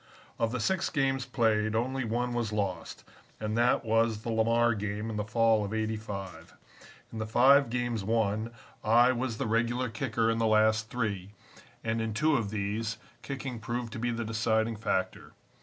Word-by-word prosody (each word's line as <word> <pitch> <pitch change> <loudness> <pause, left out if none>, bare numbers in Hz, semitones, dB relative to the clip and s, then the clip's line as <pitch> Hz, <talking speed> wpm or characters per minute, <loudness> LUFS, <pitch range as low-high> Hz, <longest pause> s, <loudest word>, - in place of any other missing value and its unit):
"Of 115 -1 +1
the 125 - -2
six 190 +10 0
games 135 -3 0
played, 110 -3 +1
only 130 +3 0
one 120 +2 -1
was 120 -3 -1
lost, 100 -5 -3 0.4
and 110 0 -2
that 120 0 +2
was 115 -1 +1
the 115 - -3
Lamar 115 +1 +3
game 105 +1 -3
in - - -5
the 105 - -1
fall 110 0 +2
of 105 +2 -4
'85. 105 -6 -5 0.6
In 110 - -5
the 110 - -3
five 130 +4 +5
games 120 -3 -2
won 110 +1 0 0.3
I 120 +3 +5
was 125 -2 -2
the - - -2
regular 115 +2 0
kicker 115 -1 0
in 115 - -1
the 115 - +2
last 110 0 +3
three, 100 -5 -3 0.5
and, 115 0 -1
in 110 -1 -3
two 155 +6 +3
of 115 -6 0
these, 105 +2 -2 0.2
kicking 130 -2 -5
proved 115 +1 -4
to - - -5
be 120 +1 -1
the 115 -1 -2
deciding 110 0 0
factor. 95 -3 -2
115 Hz, 175 wpm, -29 LUFS, 110-120 Hz, 0.6 s, five